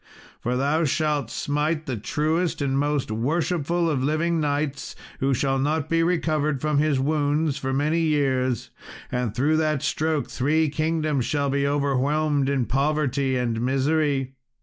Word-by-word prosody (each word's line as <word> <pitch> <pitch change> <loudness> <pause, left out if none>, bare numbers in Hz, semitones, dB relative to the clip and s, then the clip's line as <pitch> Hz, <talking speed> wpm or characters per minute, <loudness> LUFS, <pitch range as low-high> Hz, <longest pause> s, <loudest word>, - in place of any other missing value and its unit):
For 125 +1 -1
thou 145 +5 +1
shalt 150 -4 0
smite 150 +4 -1
the 130 - -3
truest 155 - -1
and 140 -2 0
most 145 -3 0
worshipful 165 +7 0
of 140 -5 0
living 160 +3 +1
knights, 145 -2 -2 0.2
who 135 0 +1
shall 135 +1 0
not 150 +2 0
be 165 0 +2
recovered 155 -4 0
from 150 +1 +1
his 150 -3 +2
wounds 150 +1 0
for 135 -1 -2
many 150 +5 +1
years, 135 -6 0 0.4
and 125 -3 -2
through 150 +5 +2
that 155 -3 0
stroke 155 0 0
three 155 +4 +1
kingdoms 155 -3 0
shall 145 -2 0
be 140 0 +1
overwhelmed 145 +1 +1
in 135 -3 +1
poverty 140 -1 0
and 115 -2 -1
misery." 135 +1 +1
145 Hz, 150 wpm, -24 LUFS, 135-155 Hz, 0.4 s, be